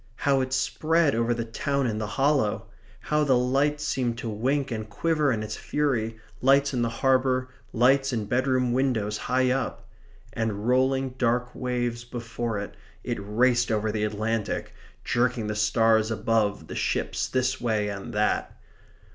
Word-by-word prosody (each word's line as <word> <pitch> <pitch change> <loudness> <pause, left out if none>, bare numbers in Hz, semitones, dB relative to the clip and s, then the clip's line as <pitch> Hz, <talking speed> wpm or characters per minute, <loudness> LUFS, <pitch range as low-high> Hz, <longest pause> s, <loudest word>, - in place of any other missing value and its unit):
How 135 0 +2
it 130 0 -3
spread 155 +3 +2
over 115 +1 +1
the 120 -1 -1
town 140 +4 -1
in 110 -3 -1
the 105 - -3
hollow! 135 -6 +2 0.4
How 150 0 +1
the 135 -4 +3
lights 140 +4 +1
seemed 120 -5 -1
to 120 -1 -4
wink 130 +6 -1
and 110 -1 -4
quiver 150 +6 +1
in 110 -3 -1
its 105 - -5
fury, 120 -7 -1 0.2
lights 140 +2 +4
in 125 - 0
the 115 - +1
harbour, 130 +1 +1 0.2
lights 135 +3 +3
in 110 -4 -2
bedroom 125 +1 +1
windows 120 -5 0
high 130 0 +3
up! 135 +1 -3 0.5
And 110 -1 -2
rolling 130 +1 +2
dark 125 0 +1
waves 120 -2 -2
before 115 -2 -4
it, 100 0 -6 0.3
it - - -3
raced 120 +4 +2
over 110 0 0
the 105 0 -2
Atlantic, 110 +1 -2 0.3
jerking 120 -2 0
the 105 0 -3
stars 110 +1 +3
above 110 -5 0
the - - -8
ships - - -1
this 130 0 0
way 110 -3 0
and 100 +2 -5
that. 105 -1 0
120 Hz, 160 wpm, -26 LUFS, 110-130 Hz, 0.5 s, lights